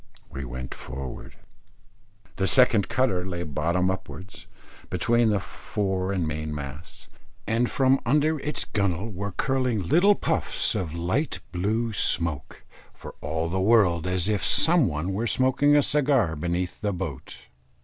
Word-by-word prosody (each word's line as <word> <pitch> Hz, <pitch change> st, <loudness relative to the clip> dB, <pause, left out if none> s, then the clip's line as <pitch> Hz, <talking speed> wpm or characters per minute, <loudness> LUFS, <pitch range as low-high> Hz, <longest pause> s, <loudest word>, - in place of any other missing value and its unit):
We 65 Hz, 0 st, -6 dB
went 65 Hz, +1 st, -7 dB
forward. 65 Hz, 0 st, -8 dB, 1.0 s
The 95 Hz, -, +1 dB
second 115 Hz, -5 st, +4 dB
cutter 110 Hz, -9 st, +1 dB
lay 90 Hz, -2 st, -4 dB
bottom 85 Hz, +4 st, 0 dB
upwards, 95 Hz, +2 st, -8 dB, 0.4 s
between 120 Hz, -1 st, +2 dB
the 105 Hz, -2 st, +1 dB
fore 95 Hz, -1 st, -3 dB
and 90 Hz, -5 st, -1 dB
main 80 Hz, -1 st, -4 dB
masts, 70 Hz, +3 st, -9 dB, 0.4 s
and 115 Hz, +2 st, 0 dB
from 135 Hz, 0 st, +3 dB
under 150 Hz, +5 st, +1 dB
its 145 Hz, +1 st, -3 dB
gunnel 100 Hz, +1 st, -2 dB
were 100 Hz, +1 st, -4 dB
curling 130 Hz, -2 st, -1 dB
little 195 Hz, -, +5 dB
puffs 160 Hz, -8 st, -1 dB
of 90 Hz, -7 st, -3 dB
light 90 Hz, -, -1 dB
blue 110 Hz, +6 st, -1 dB
smoke, 80 Hz, -9 st, 0 dB, 0.3 s
for -, -, -11 dB
all 80 Hz, +3 st, -2 dB
the 95 Hz, +3 st, -1 dB
world 95 Hz, -5 st, +3 dB
as 90 Hz, 0 st, 0 dB
if 105 Hz, -2 st, 0 dB
some 165 Hz, -5 st, +5 dB
one 80 Hz, +4 st, -3 dB
were 110 Hz, +5 st, -1 dB
smoking 130 Hz, +4 st, +3 dB
a 145 Hz, -, +4 dB
cigar 135 Hz, -, +2 dB
beneath 85 Hz, +3 st, -3 dB
the 105 Hz, -2 st, -1 dB
boat. 85 Hz, -7 st, -6 dB
95 Hz, 145 wpm, -25 LUFS, 85-120 Hz, 1.0 s, little